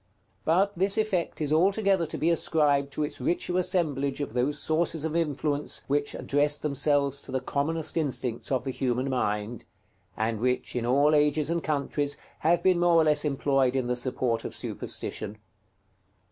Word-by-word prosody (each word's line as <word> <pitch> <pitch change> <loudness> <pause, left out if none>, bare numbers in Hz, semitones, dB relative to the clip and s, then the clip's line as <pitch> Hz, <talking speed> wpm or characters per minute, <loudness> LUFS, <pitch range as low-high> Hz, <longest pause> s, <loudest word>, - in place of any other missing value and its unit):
But 190 +5 +3
this 195 +3 +1
effect 195 -7 -1
is 150 0 0
altogether 195 +1 +2
to - - -5
be 165 +2 +2
ascribed 145 -4 +2
to 155 - -1
its 150 - -4
richer 175 0 -1
assemblage 150 -7 0
of 145 -6 -4
those 125 +4 0
sources 160 -1 +1
of 160 0 -2
influence 150 -2 -1
which 145 +1 -1
address 145 +1 +1
themselves 140 -1 +1
to - - -7
the 130 - 0
commonest 155 +4 -2
instincts 135 -7 -2
of 130 - +1
the 135 - -3
human 130 +1 -1
mind, 105 -2 -2 0.5
and 110 0 -1
which, 125 +2 -1
in 120 -1 -1
all 140 +4 +4
ages 150 +1 +2
and 170 0 0
countries, 145 -1 -1 0.2
have 170 +2 +2
been 185 -2 +3
more 175 -1 +4
or 165 - +6
less 150 -1 +3
employed 135 -3 +1
in 130 -2 0
the 125 0 0
support 120 -2 -1
of - - -5
superstition. 105 - -4
145 Hz, 170 wpm, -27 LUFS, 130-165 Hz, 0.5 s, or